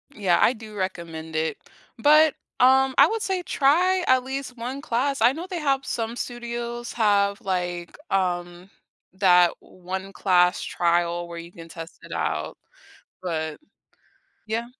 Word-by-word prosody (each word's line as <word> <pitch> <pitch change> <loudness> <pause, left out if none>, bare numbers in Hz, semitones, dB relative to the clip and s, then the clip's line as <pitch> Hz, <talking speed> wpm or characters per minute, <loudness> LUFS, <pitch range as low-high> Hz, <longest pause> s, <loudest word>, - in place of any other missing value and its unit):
Yeah, 190 -4 +2
I 250 - +5
do 215 -2 -11
recommend 165 -4 -5
it, 160 0 -1 0.4
but, 305 +3 +6 0.3
um, 265 +1 +5
I 280 - +8
would 445 +2 -2
say 375 -2 -1
try 355 +8 +3
at 255 -1 +4
least 265 -1 -5
1 255 +4 -5
class. 275 -1 -1
I 240 +2 +6
know 335 +4 -6
they 355 -2 -3
have 275 -2 0
some 230 0 -3
studios 240 0 -5
have, 200 -3 +2
like, 175 -2 -3 0.2
um, 175 -1 -1 0.4
that 180 -2 +5
one-class 185 -1 0
trial 175 0 0
where 170 0 -8
you 170 +1 -9
can 165 -1 -12
test 165 0 -10
it - - -12
out, - - -2 0.6
but 160 -3 -3 0.9
yeah. 230 +2 -2
210 Hz, 140 wpm, -24 LUFS, 175-260 Hz, 0.9 s, I